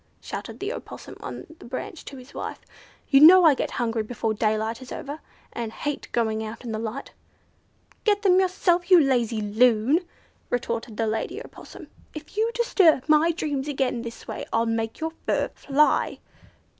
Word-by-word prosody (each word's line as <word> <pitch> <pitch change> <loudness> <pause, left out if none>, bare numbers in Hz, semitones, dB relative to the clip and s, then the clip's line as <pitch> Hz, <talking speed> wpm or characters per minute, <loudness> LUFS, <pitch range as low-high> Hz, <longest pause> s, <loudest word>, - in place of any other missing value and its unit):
shouted - - -7
the 405 +4 -3
Opossum - - -9
on - - -7
the - - -13
branch 335 - -6
to 275 - -9
his 255 +1 -13
wife. - - -5 0.5
"You 275 - +6
know 355 +5 +9
I 310 - +7
get - - -2
hungry 230 -2 -1
before 225 0 -2
daylight 220 +2 -1
is 255 - -11
over, 290 +2 -6 0.3
and 230 -2 -4
hate 290 +5 -4
going 220 -2 0
out 220 +2 -7
in 230 - -4
the 215 - -3
light." 230 +4 -5 0.9
"Get 415 -1 +2
them 370 -2 +5
yourself, 360 -1 +1
you 365 -2 +8
lazy 240 -6 +1
loon!" 225 +6 +3 0.5
retorted 230 -2 -3
the 225 - +1
lady 220 0 -2
Opossum. - - -11 0.3
"If 310 +4 -10
you 440 +2 +2
disturb 375 - +3
my 310 +2 +4
dreams 295 -4 -3
again 265 -4 -1
this 230 -1 -9
way, - - -5
I'll 230 0 +2
make 225 -1 -2
your 320 0 -2 0.2
fur - - +1
fly." 290 +2 +1
260 Hz, 170 wpm, -25 LUFS, 225-320 Hz, 0.9 s, know